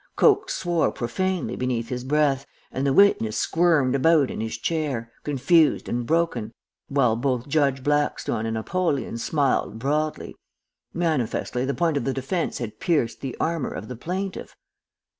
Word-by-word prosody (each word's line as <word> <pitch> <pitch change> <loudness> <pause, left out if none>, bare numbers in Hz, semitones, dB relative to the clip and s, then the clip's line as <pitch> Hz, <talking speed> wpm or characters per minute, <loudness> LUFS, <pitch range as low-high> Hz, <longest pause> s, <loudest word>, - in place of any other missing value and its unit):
"Coke 410 -3 +4
swore 175 -2 0
profanely 180 +8 -2
beneath 125 -2 -2
his 125 -1 -3
breath, 140 -1 +1 0.2
and 135 +2 -1
the - - +3
witness 125 - +4
squirmed 160 -6 +2
about 145 0 +3
in - - -4
his 110 0 -3
chair, 135 -5 -2
confused 150 +2 +3
and 120 0 -2
broken, 155 -9 0 0.3
while 135 -5 +2
both 125 +1 -1
Judge 140 -3 +1
Blackstone 145 -6 0
and 115 0 -2
Apollyon 140 -2 -1
smiled 135 -4 0
broadly. 150 +5 -2 0.6
Manifestly 140 -6 -1
the 140 - -1
point 165 -4 +1
of 140 - -1
the 135 - 0
defence 140 +7 -2
had 115 -3 -6
pierced 150 -10 0
the 135 -3 -5
armor 165 -3 -1
of 105 - -7
the 125 - -5
plaintiff. 185 - -5
140 Hz, 150 wpm, -24 LUFS, 120-165 Hz, 0.6 s, Coke